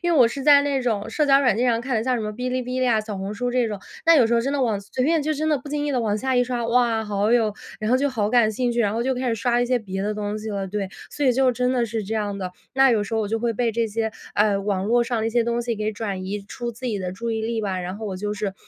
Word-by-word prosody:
因 345 0 +1
为 310 - +3
我 235 -2 +7
是 275 +3 -5
在 290 -1 +7
那 280 -2 0
种 220 -4 -1
社 305 - +1
交 275 0 +6
软 245 -7 +3
件 250 +2 +1
上 230 -1 +2
看 255 -1 -1
的， 220 - -1
像 255 -1 +1
什 235 - -1
么 210 - -3
哔 250 +4 -3
哩 255 0 -1
哔 250 +1 -3
哩 255 - +2
啊， 225 -2 +3
小 215 -2 -6
红 195 +2 -4
书 245 +3 -2
这 245 -1 +1
种。 210 -2 -4 0.3
但 330 0 +7
有 245 - +5
时 235 - +1
候 230 - +3
真 275 +2 -1
的 285 - 0
往 220 -5 +1
随 200 +5 -3
便 320 0 +2
就 310 - 0
真 310 +1 -1
的 300 - +3
不 270 - -15
经 295 0 -1
意 290 - -1
地 255 - +1
往 215 -3 0
下 260 +1 0
一 245 - +4
刷， 245 -1 -2
哇， 235 -2 +2
好 205 +2 +1
有 220 -4 +2 0.3
然 215 +2 -1
后 255 - +5
就 285 +2 +1
好 210 -4 0
感 220 -2 +3
兴 245 +3 0
趣， 235 0 0
然 205 -2 +2
后 230 +1 -1
就 260 +1 0
开 250 0 -2
始 230 - +1
刷 240 +2 +1
一 - - +2
些 250 0 +2
别 195 -3 -5
的 210 +1 -1
东 210 0 -3
西 215 +1 -5
了， 195 -2 -3
对， 200 -1 -3 0.2
所 290 - -2
以 255 - +5
就 260 +1 +3
真 250 +1 0
的 240 -2 +1
是 220 -2 -3
这 220 +3 -3
样 205 -2 -2
的。 185 -2 -5 0.2
那 270 -1 +5
有 215 -3 +2
时 205 +3 -4
候 225 - +1
我 210 - -2
就 225 - 0
会 235 0 0
被 235 -1 0
这 230 0 0
些， 220 +1 -2 0.2
呃， 205 -1 +3
网 195 -1 -1
络 240 +3 +3
上 235 -1 -1
的 - - 0
一 225 - -1
些 240 0 +2
东 235 +1 -1
西 235 -1 -2
给 215 +1 -1
转 200 -3 -4
移 200 +1 -4
出 240 +2 -5
自 250 +3 -7
己 215 -4 -1
的 180 -1 -4
注 230 +4 -4
意 220 0 -1
力 225 0 -1
吧， 190 -3 -2
然 180 +2 -5
后 220 0 -6
我 190 -2 -4
就 210 +2 -3
是， 205 -2 -3
230 Hz, 370 characters per minute, -23 LUFS, 210-250 Hz, 0.3 s, 我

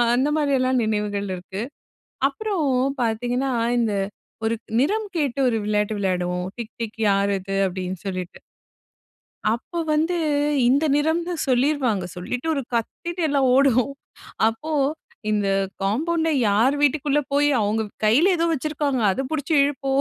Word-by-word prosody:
அந்த 270 +4 +2
மாதிரியெல்லாம் 260 -4 +2
நினைவுகள் 210 -2 -1
இருக்கு. 190 +3 -7 0.7
அப்புறம் 365 0 -2 0.4
பார்த்தீங்கன்னா, 245 +4 -1 0.3
இந்த 220 -3 +1 0.5
ஒரு 230 +1 +1 0.2
நிறம் 420 +10 +1
கேட்டு 280 -3 -1
ஒரு 225 -2 +1
விளையாட்டு 210 0 0
விளையாடுவோம். 180 -2 -1
டிக் 235 -1 -6
டிக் 225 -1 -5
யார் 200 0 +2
இது? 195 +1 -5
அப்பிடின்னு 185 -1 -4
சொல்லிட்டு, 185 -2 -5 1.2
அப்ப 335 +8 -4
வந்து 325 +3 +1 0.5
இந்த 285 +4 +3
நிறம்ன்னு 335 +3 0
சொல்லிருவாங்க. 255 -7 +1
சொல்லிட்டு 250 - -4
ஒரு 275 - -1
கத்திட்டு 340 +9 -3
எல்லாம் 275 -2 +2
ஓடுவோம். 270 0 +3 0.6
அப்போ 305 +8 -5 0.6
இந்த 205 -2 +1 0.4
காம்பவுண்ட்ல 320 +10 0 0.2
யார் 235 +8 +3
வீட்டுக்குள்ள 290 0 +2
போய் 290 +1 +4
அவுங்க 210 +2 +1 0.2
கையில 270 - +5
ஏதோ 335 - +1
வச்சிருக்காங்க. 290 -3 -1
அதப் 270 +4 -3
பிடிச்சு 310 +1 -1
இழுப்போம்., 275 -1 0
255 Hz, 125 wpm, -23 LUFS, 210-295 Hz, 1.2 s, கையில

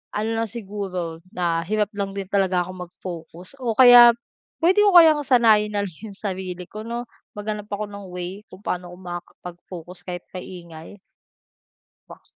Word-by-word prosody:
Ano 215 +2 -1
lang 225 - 0
siguro 190 -7 -5 0.2
na 170 -2 0
hirap 210 0 0
lang 200 -1 -2
din 195 -1 -4
talaga 190 -3 +2
ako 185 - -8 0.2
mag-focus 175 +6 -9
o 235 -3 -2
kaya 245 -2 +10 0.5
puwede 370 +4 +5
ko 410 - +5
kayang 320 -3 +8
sanayin 220 -5 +4
nalang 200 -2 -1
yung 210 -3 -8
sarili 185 -3 -4
ko, 215 +3 -8
'no? 235 +1 -3 0.3
Maghanap 210 0 -4
ako 205 +1 -3
ng 200 -1 -9
way 180 +3 -6
kung 185 +2 -14
paano 180 -2 -3
ko 180 - -12
makakapag-focus 175 0 -9
kahit 175 -1 -5
maingay. 170 -1 -9 1.1
Ba - - -14
195 Hz, 155 wpm, -23 LUFS, 180-215 Hz, 1.1 s, kaya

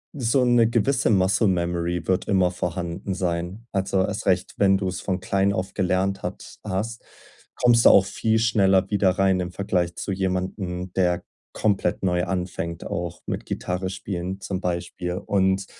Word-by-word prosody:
so 125 -1 +2
'ne 120 -2 +4
gewisse 120 +4 +2
Muscle-Memory 90 -3 +1
wird 95 0 0
immer 95 -3 +3
vorhanden 90 +1 -3
sein. 90 +4 -3
Also, 95 -1 +1
erst 105 0 -4
recht, 90 -1 +1
wenn 95 -1 +4
du's 95 -2 -3
von 95 -1 -2
klein 100 +1 +1
auf 95 0 -3
gelernt 95 0 0
hat - - -7
hast, 105 +3 -3 0.5
kommst 120 -1 +4
du - - +10
auch 95 - +6
viel 110 +3 0
schneller 95 -4 +3
wieder 100 -2 +3
rein 95 0 +2
im 90 0 -4
Vergleich 90 -3 -1
zu - - -4
jemandem, 90 -1 -3
der 90 -2 +1 0.3
komplett 105 -2 0
neu 90 -1 +1
anfängt, 90 -3 -4
auch 85 0 -4
mit - - -3
Gitarre 90 +1 -3
spielen 95 0 -5
zum 95 -1 -4
Beispiel. 90 0 -3
Und 95 +1 +1
95 Hz, 155 wpm, -24 LUFS, 90-100 Hz, 0.5 s, du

